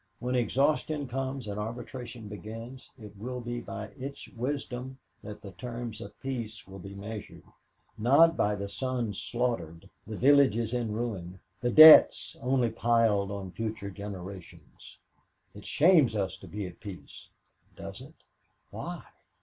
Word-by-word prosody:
When 125 Hz, +1 st, -3 dB
exhaustion 140 Hz, +5 st, +1 dB
comes 130 Hz, -1 st, -4 dB
and 100 Hz, 0 st, -4 dB
arbitration 120 Hz, +1 st, -6 dB
begins 115 Hz, +5 st, -9 dB
it 105 Hz, -4 st, -12 dB
will 125 Hz, +3 st, -5 dB
be 120 Hz, 0 st, -4 dB
by 110 Hz, -2 st, -7 dB
its 140 Hz, +2 st, -7 dB
wisdom 130 Hz, 0 st, -4 dB, 0.2 s
that 105 Hz, 0 st, -9 dB
the 100 Hz, -, -8 dB
terms 115 Hz, +2 st, -6 dB
of 100 Hz, -, -10 dB
peace 115 Hz, -7 st, -5 dB
will 95 Hz, 0 st, -10 dB
be 100 Hz, +2 st, -9 dB
measured, 105 Hz, +1 st, -8 dB, 0.6 s
not 145 Hz, +9 st, +6 dB
by 105 Hz, -6 st, +1 dB
the 100 Hz, 0 st, -4 dB
sons 120 Hz, -2 st, -2 dB
slaughtered, 95 Hz, -8 st, -2 dB, 0.2 s
the 110 Hz, -1 st, -5 dB
villages 125 Hz, -5 st, +4 dB
in 120 Hz, -3 st, -1 dB
ruins, 100 Hz, -6 st, -4 dB, 0.2 s
the 120 Hz, -, 0 dB
debts 155 Hz, +5 st, +9 dB
only 125 Hz, -2 st, +1 dB
piled 115 Hz, -4 st, +2 dB
on 100 Hz, -2 st, -5 dB
future 110 Hz, +1 st, -4 dB
generations. 95 Hz, -2 st, -10 dB, 0.6 s
"'It -, -, -11 dB
shames 155 Hz, -8 st, +5 dB
us 95 Hz, -3 st, -1 dB
to -, -, -13 dB
be 105 Hz, -1 st, -5 dB
at 90 Hz, -2 st, -10 dB
peace.' 100 Hz, -4 st, -10 dB, 0.5 s
Does -, -, -8 dB
it? -, -, -13 dB, 0.6 s
Why? -, -, -6 dB
115 Hz, 140 wpm, -29 LUFS, 100-125 Hz, 0.6 s, debts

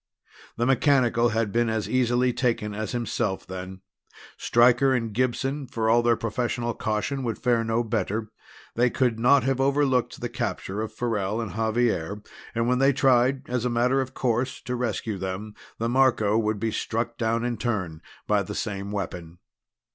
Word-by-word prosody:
The 120 Hz, -, +1 dB
mechanical 130 Hz, -3 st, +3 dB
had 115 Hz, -2 st, 0 dB
been 120 Hz, +1 st, +1 dB
as 110 Hz, -3 st, -1 dB
easily 125 Hz, +1 st, +2 dB
taken 115 Hz, -5 st, -1 dB
as 110 Hz, +1 st, -4 dB
himself, 115 Hz, -5 st, -2 dB
then. 95 Hz, 0 st, -7 dB, 0.5 s
Stryker 125 Hz, +3 st, +4 dB
and 115 Hz, -3 st, -2 dB
Gibson, 130 Hz, +4 st, -1 dB
for 110 Hz, -1 st, 0 dB
all 120 Hz, +1 st, +5 dB
their 120 Hz, 0 st, +3 dB
professional 120 Hz, +1 st, -2 dB
caution, 110 Hz, +7 st, -2 dB
would 115 Hz, -3 st, -2 dB
fare 120 Hz, -2 st, +1 dB
no 115 Hz, +1 st, 0 dB
better 110 Hz, -1 st, -2 dB, 0.4 s
they 120 Hz, +1 st, +3 dB
could 120 Hz, -3 st, 0 dB
not 130 Hz, +3 st, +5 dB
have 135 Hz, 0 st, 0 dB
overlooked 135 Hz, -2 st, +1 dB
the 120 Hz, -, -3 dB
capture 100 Hz, -3 st, -3 dB
of 110 Hz, -, -4 dB
Farrell 110 Hz, -2 st, -2 dB
and 110 Hz, -6 st, -4 dB
Xavier, 110 Hz, -4 st, 0 dB, 0.3 s
and 115 Hz, 0 st, +1 dB
when 125 Hz, +1 st, +2 dB
they 135 Hz, +1 st, +4 dB
tried 130 Hz, 0 st, +2 dB
as 125 Hz, -1 st, -1 dB
a 125 Hz, -, 0 dB
matter 125 Hz, +3 st, +2 dB
of 130 Hz, 0 st, -6 dB
course 125 Hz, +1 st, -1 dB
to 125 Hz, -, -3 dB
rescue 110 Hz, -4 st, -2 dB
them 95 Hz, +3 st, -5 dB, 0.2 s
the 115 Hz, -, -1 dB
Marco 120 Hz, -4 st, +3 dB
would 110 Hz, -2 st, 0 dB
be 110 Hz, +1 st, -1 dB
struck 115 Hz, +2 st, -3 dB
down 115 Hz, 0 st, 0 dB
in 120 Hz, -1 st, -1 dB
turn 95 Hz, -9 st, -3 dB, 0.2 s
by 105 Hz, -1 st, +2 dB
the 95 Hz, -, -6 dB
same 100 Hz, -3 st, -3 dB
weapon. 90 Hz, -4 st, -5 dB
115 Hz, 170 wpm, -25 LUFS, 110-125 Hz, 0.5 s, all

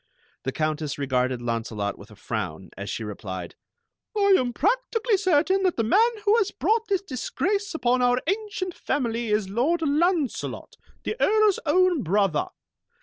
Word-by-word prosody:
The 135 Hz, -, 0 dB
Countess 155 Hz, -1 st, -2 dB
regarded 130 Hz, -3 st, 0 dB
Launcelot 115 Hz, -3 st, -2 dB
with 100 Hz, -, -14 dB
a 105 Hz, -, -14 dB
frown, 95 Hz, -5 st, -5 dB
as 100 Hz, +1 st, -6 dB
she 115 Hz, -, -3 dB
replied: 95 Hz, -4 st, -6 dB, 0.6 s
"I 400 Hz, -1 st, +5 dB
am 250 Hz, -7 st, +1 dB
practically 455 Hz, -, +1 dB
certain 375 Hz, 0 st, +2 dB
that 370 Hz, -2 st, +1 dB
the 230 Hz, -, +2 dB
man 425 Hz, -, +4 dB, 0.2 s
who 415 Hz, +1 st, +5 dB
has 420 Hz, -4 st, +2 dB
brought 450 Hz, +1 st, 0 dB
this 390 Hz, -1 st, 0 dB
disgrace 370 Hz, -, -2 dB
upon 250 Hz, -4 st, +2 dB
our 245 Hz, 0 st, +3 dB
ancient 395 Hz, -1 st, -2 dB
family 235 Hz, -6 st, -2 dB
is 210 Hz, -2 st, +1 dB
Lord 275 Hz, -, 0 dB
Launcelot, 310 Hz, 0 st, 0 dB, 0.3 s
the -, -, -2 dB
Earl's 430 Hz, -2 st, +4 dB
own 360 Hz, 0 st, +3 dB
brother. 190 Hz, -4 st, +1 dB
255 Hz, 150 wpm, -25 LUFS, -, 0.6 s, I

